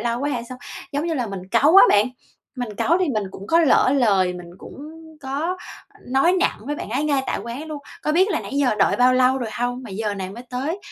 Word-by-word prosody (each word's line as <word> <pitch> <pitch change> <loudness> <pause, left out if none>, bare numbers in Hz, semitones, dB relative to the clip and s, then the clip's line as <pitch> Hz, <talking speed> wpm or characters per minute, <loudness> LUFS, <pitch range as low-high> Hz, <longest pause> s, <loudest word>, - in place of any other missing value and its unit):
lâu 235 +2 -2
quá 285 - -1
hay 240 -4 -3
sao?" 255 - -8 0.3
Giống 290 +4 -1
như 330 - -1
là 245 -5 -1
mình 190 -2 -7
cáu 285 - +5
á - - +10
bạn, 205 +4 +4 0.5
mình 245 -4 -4
cáu 335 - +2
thì 370 - 0
mình 215 -6 -1
cũng 195 +1 -10
có 330 +7 +4
lỡ 275 -4 +4
lời, 195 -8 +3
mình 175 -1 -10
cũng 295 +8 -10 0.3
có 295 +7 -2 0.5
nói 270 +7 +3
nặng - - +1
với 295 - -2
bạn - - -7
ấy 275 +5 -1
ngay 280 -3 +1
tại - - -1
quán 240 +7 -6
luôn: 305 -2 -6 0.2
"Có 305 - 0
biết 375 +5 +4
là 340 - 0
nãy - - -8
giờ 275 -5 +2
đợi - - +3
bao 250 +1 +4
lâu 255 +1 +3
rồi 235 -4 -4
hông 245 +1 -2
mà 230 - -9
giờ 210 +1 -3
này 190 -1 -5
mới 235 +5 -9
tới, 275 +9 -3
255 Hz, 255 wpm, -22 LUFS, 225-295 Hz, 0.5 s, á